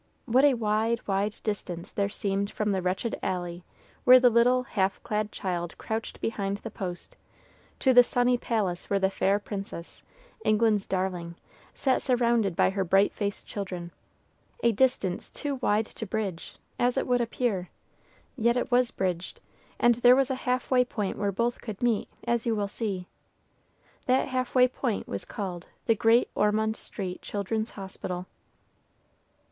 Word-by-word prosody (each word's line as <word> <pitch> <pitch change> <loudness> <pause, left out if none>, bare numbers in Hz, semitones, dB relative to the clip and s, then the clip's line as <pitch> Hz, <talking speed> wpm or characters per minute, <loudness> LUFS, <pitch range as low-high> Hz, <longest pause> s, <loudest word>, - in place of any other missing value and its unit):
What 255 +3 +4
a 285 -3 +6
wide, 225 +1 0
wide 200 +1 0
distance 180 -5 -4
there 200 -1 0
seemed 200 -1 -1
from 210 -1 -1
the 190 -1 0
wretched 185 +6 -2
alley 175 -1 -3 0.4
where 255 0 +9
the 250 -1 +5
little, 245 +2 +4
half 195 -6 0
clad 210 0 -1
child 175 -2 -3
crouched 220 0 -4
behind 200 -3 -2
the 225 - -8
post, 180 -4 -6 0.7
to 260 - +4
the 245 0 +9
sunny 245 +1 +2
palace 210 -7 -2
where 200 - +2
the 190 0 +1
fair 195 +1 +2
princess, 195 -4 -7 0.4
England's 215 -2 +2
darling, 180 -3 -2 0.4
sat 265 -2 +1
surrounded 235 -7 +2
by - - +3
her 195 0 0
bright 195 +3 +3
faced 205 -1 -3
children, 180 -4 -5 0.7
a 235 - +5
distance 220 -5 +1
too 285 -3 -4
wide 215 -1 +2
to 220 - -8
bridge, 195 -5 -4 0.2
as 245 +2 +2
it - - +1
would 245 -1 +2
appear; 225 -6 -1 0.7
yet 235 -1 +2
it 245 - -2
was 245 0 +4
bridged, 180 -2 -3 0.4
and 240 - +5
there 245 +1 +8
was 270 0 +2
a 260 -1 -3
half 250 +1 0
way 250 -1 +5
point 210 -5 -3
where 200 -1 -1
both 235 +5 -1
could 215 -4 -6
meet, 235 -4 +1 0.2
as 235 -1 0
you 230 - +2
will 205 -1 -1
see. 200 -3 -3 1.0
That 260 +1 +2
half 255 0 -2
way 250 0 +7
point 245 -3 -3
was 100 - -5
called 180 -4 -5 0.2
"The 225 - +4
Great 225 +3 +4
Ormond 220 +1 +1
Street 185 -5 -6
Child's 215 +2 -2
Hospital." 185 -2 -6
215 Hz, 160 wpm, -28 LUFS, 195-240 Hz, 1.0 s, where